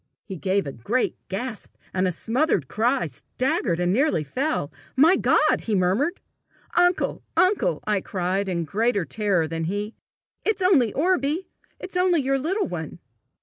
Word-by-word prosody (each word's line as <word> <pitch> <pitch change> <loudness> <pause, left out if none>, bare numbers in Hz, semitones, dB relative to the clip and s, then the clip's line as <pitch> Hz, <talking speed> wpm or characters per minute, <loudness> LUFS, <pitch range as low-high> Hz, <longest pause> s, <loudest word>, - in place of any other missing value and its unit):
He 195 - -6
gave 190 +2 0
a 140 - -4
great 210 - -1
gasp 220 +3 -5 0.2
and 185 0 +1
a - - +1
smothered 225 - 0
cry, 240 - +1
staggered, 170 - -1
and 180 +1 +1
nearly 265 - +2
fell. 255 - -2 0.2
"My 320 +8 +6
God!" - - +3
he 220 - 0
murmured. 200 - +1 0.5
"Uncle! 355 +1 +2 0.2
uncle!" 410 +6 +2
I 210 -2 +1
cried, 190 +2 -2
in 170 -2 -1
greater 205 +3 0
terror 190 -1 0
than 165 0 -3
he; 205 +5 -3 0.5
"it's 435 -3 0
only 285 - +4
Orbie! 320 +1 0 0.3
It's 370 - -7
only 360 -2 +3
your 270 +1 +1
little 375 +10 0
one!" 160 -4 -6
220 Hz, 150 wpm, -24 LUFS, 180-305 Hz, 0.5 s, My